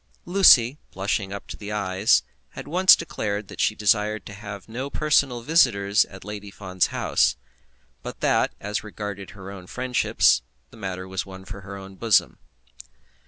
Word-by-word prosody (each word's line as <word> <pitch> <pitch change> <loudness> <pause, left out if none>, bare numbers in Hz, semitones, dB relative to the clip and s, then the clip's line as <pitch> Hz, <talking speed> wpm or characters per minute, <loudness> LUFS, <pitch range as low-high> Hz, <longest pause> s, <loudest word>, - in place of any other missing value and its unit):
Lucy, 150 -8 +6
blushing 95 0 -2
up 100 - -7
to - - -8
the 105 0 -8
eyes, 100 0 +2 0.3
had - - -7
once 185 +5 +6
declared 110 - -4
that - - -5
she 105 - +2
desired 105 0 +1
to 105 - -9
have 100 0 -9
no 125 +5 -5
personal 140 -5 +1
visitors 110 -9 +3
at 95 -1 -13
Lady 105 -1 -7
Fawn's 95 -2 -1
house; - - +1 0.7
but - - -8
that, - - +2
as 105 +1 -3
regarded 105 -2 -7
her 95 0 -9
own 90 -2 -10
friendships, 125 - +2 0.3
the - - -15
matter 95 -3 -5
was 95 0 -3
one 95 0 -11
for 100 - -9
her 100 +1 -8
own 95 0 -10
bosom. 110 0 +2
105 Hz, 165 wpm, -24 LUFS, 95-115 Hz, 0.7 s, Lucy